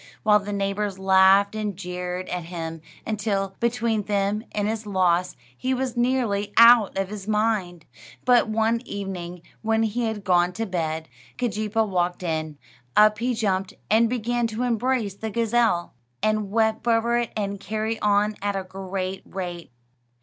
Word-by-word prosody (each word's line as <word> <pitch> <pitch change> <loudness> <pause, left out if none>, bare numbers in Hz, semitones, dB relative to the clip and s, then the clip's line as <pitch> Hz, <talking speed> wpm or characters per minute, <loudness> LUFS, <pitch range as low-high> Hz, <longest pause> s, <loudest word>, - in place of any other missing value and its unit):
while 210 0 +5
the 205 0 -6
neighbors 200 0 -2
laughed 190 +1 +5
and 210 -3 -3
jeered 180 0 -4
at 180 -2 -3
him, 165 -2 -6 0.2
until, 200 -3 -2
between 235 -2 0
them 205 +1 -1
and 205 -1 -1
his 220 0 -3
loss, 180 -2 +1 0.2
he 260 - -1
was 255 -1 -2
nearly 240 -5 0
out 230 -4 +7
of 195 -1 -1
his 205 -1 -7
mind. 210 -6 0 0.4
But 245 -3 +4
one 225 +1 +1
evening, 180 -3 -6 0.2
when 225 0 +1
he 230 +2 -1
had 220 -2 -3
gone 180 -1 +3
to 225 +4 -3
bed, 160 -4 -3 0.3
Keejeepaa 220 -2 0
walked 180 -1 -1
in. 155 -3 -3 0.4
Up 210 0 +6
he 245 +1 0
jumped, 195 -4 -1 0.2
and 225 +1 +4
began 240 0 0
to 225 +2 -3
embrace 240 -3 0
the 220 +3 -5
gazelle, 230 -5 +1 0.3
and 215 -2 +1
weep 220 +1 +1
over 235 +1 +3
it, 240 - -2
and 200 -1 -2
carry 220 +2 -3
on 210 +1 +2
at 200 0 -1
a 195 - -2
great 190 0 -5
rate. 175 -3 -6
205 Hz, 155 wpm, -24 LUFS, 190-225 Hz, 0.4 s, out